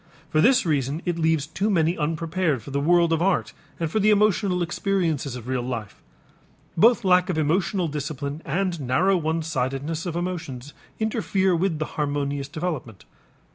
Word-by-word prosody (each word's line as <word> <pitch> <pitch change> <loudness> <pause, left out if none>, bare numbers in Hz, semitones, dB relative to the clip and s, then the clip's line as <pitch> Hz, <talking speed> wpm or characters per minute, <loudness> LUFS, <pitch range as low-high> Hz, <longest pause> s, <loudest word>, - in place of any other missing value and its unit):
For 155 - +3
this 255 +3 +4
reason 145 0 -1
it 175 -2 -1
leaves 160 -2 +2
too 190 +7 -2
many 170 -3 +2
unprepared 165 - -1
for 140 - -9
the 140 - 0
world 170 +2 +3
of 165 - 0
art 190 0 +1 0.3
and 165 -2 -2
for 220 - +1
the 210 +1 +3
emotional 200 -3 +3
experiences 170 -7 -1
of 125 -1 -8
real 130 -1 -1
life. 120 -4 -5 0.7
Both 225 +4 +4
lack 180 0 +4
of 175 - -1
emotional 175 +4 +1
discipline 145 0 -4
and 175 +1 -1
narrow 165 +10 +2
one 160 -1 -1
sidedness 150 +3 -2
of 170 - -3
emotions 160 -7 -4 0.3
interfere 200 -4 +1
with 170 -1 0
the 155 - -2
harmonious 145 -2 -2
development. 150 - -5
165 Hz, 165 wpm, -24 LUFS, 145-180 Hz, 0.7 s, this